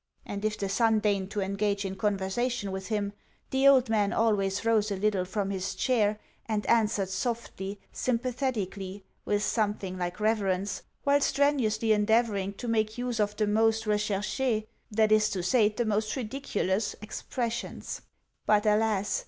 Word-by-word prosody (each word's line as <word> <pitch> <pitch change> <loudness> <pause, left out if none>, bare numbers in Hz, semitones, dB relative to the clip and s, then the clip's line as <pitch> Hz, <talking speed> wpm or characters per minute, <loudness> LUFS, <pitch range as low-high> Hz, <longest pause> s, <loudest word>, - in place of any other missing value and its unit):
And 200 0 -5
if 215 0 0
the 200 - -2
son 225 +3 +3
deigned 200 -3 0
to 205 - -2
engage 200 +1 -1
in 190 0 -3
conversation 205 +3 -1
with 190 0 -5
him, 205 -2 -1 0.4
the 265 +1 +4
old 265 -2 +6
man 210 -2 +2
always 205 -3 +1
rose 220 -2 +3
a 200 - -1
little 195 -1 +1
from 200 +1 -2
his 190 -1 -3
chair, 215 -5 +1 0.3
and 215 -2 -1
answered 215 -4 +2
softly, 200 -1 -3
sympathetically, 230 -6 -2 0.2
with 205 0 +1
something 205 -4 -1
like 175 +2 -3
reverence, 200 -3 0 0.2
while 285 0 +3
strenuously 260 -7 +2
endeavouring 210 -2 +2
to 240 - -7
make 220 -1 0
use 245 -2 -2
of 210 0 +1
the 215 - +1
most 220 +1 +2
recherche 210 +3 0 0.2
(that 215 0 +2
is 215 0 +5
to 185 -4 -3
say, 215 +2 +4
the 235 +3 -2
most 215 0 0
ridiculous) 220 -5 -1
expressions. 235 +2 -4 0.5
But, 210 0 +4
alas! 210 -2 +2
210 Hz, 155 wpm, -28 LUFS, 200-225 Hz, 0.5 s, old